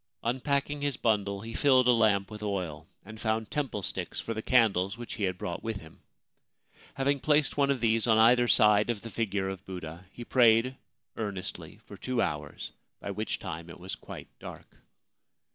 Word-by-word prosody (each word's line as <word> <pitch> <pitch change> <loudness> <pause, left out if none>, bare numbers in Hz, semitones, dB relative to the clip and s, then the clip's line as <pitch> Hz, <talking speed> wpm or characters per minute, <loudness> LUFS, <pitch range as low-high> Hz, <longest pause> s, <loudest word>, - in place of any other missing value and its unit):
Unpacking 140 +4 -1
his 145 -2 -1
bundle, 100 -3 0
he 115 +1 -7
filled 130 -1 +4
a - - +7
lamp 110 -4 +3
with 105 0 -8
oil, 90 -8 -3 0.2
and 110 0 -10
found 110 -1 -1
temple 135 -9 -2
sticks 75 - -3
for 115 - -3
the 110 - -4
candles 105 -6 +2
which 120 -1 -7
he 105 - -1
had 95 -1 -2
brought 85 -1 -4
with 115 -2 -3
him. 80 -4 -15 0.9
Having 140 +1 +1
placed 150 +1 +2
one 140 -1 +2
of 140 -2 +1
these 115 0 +2
on 110 -1 +5
either 120 +2 +5
side 105 -1 +5
of 115 -4 -1
the 115 - -8
figure 100 -4 -1
of 95 -1 -5
Buddha, 90 -1 -8
he 120 - -9
prayed 120 +1 +4 0.4
earnestly 100 -4 -5
for - - -11
two 130 -2 -2
hours, 75 -7 -3 0.3
by - - -5
which - - -3
time 80 +2 -7
it - - -11
was 95 +2 -7
quite - - -9
dark. - - -11
110 Hz, 185 wpm, -29 LUFS, 95-125 Hz, 0.9 s, a